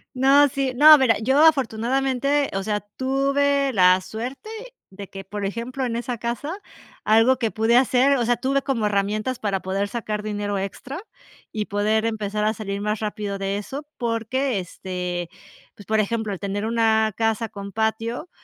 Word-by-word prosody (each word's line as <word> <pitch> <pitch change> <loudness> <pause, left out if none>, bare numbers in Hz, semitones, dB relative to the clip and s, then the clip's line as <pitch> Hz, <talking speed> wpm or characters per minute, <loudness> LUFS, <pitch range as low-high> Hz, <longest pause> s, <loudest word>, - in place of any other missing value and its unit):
No, 275 +3 +5
sí, 270 -1 -2
no, 305 +4 +9
mira, 245 -5 +3
yo 265 +7 +3
afortunadamente, 270 0 +2
o 195 - -1
sea, 210 +1 -2 0.2
tuve 275 +1 +1
la 185 -2 +5
suerte 240 - -7 0.4
de 195 +1 -9
que, 195 0 -8
por 205 +1 -6
ejemplo, 235 +6 -3
en 235 -2 -2
esa 240 0 -4
casa, 285 - -4 0.4
algo 225 +4 +4
que 230 - 0
pude 225 +2 +2
hacer, 265 +2 +4
o 245 - 0
sea, 240 +1 +2
tuve 275 +1 0
como 260 -6 -1
herramientas 210 +4 -1
para 195 -3 -1
poder 195 +2 -2
sacar 215 -1 -4
dinero 205 -1 -3
extra 255 - -6 0.5
y 215 -1 -3
poder 210 +2 0
empezar 210 -2 -2
a 215 - +2
salir 200 -2 -5
más 210 +1 -2
rápido 210 -2 -4
de 195 0 -2
eso, 275 +8 -7
porque, 235 +1 -1
este, 180 -1 -5 0.4
pues, 205 - -15
por 220 0 +2
ejemplo, 220 0 -1
el 195 - -3
tener 205 +1 -3
una 220 -1 +2
casa 225 0 0
con 200 0 -8
patio, 225 - -2
225 Hz, 170 wpm, -23 LUFS, 205-260 Hz, 0.5 s, no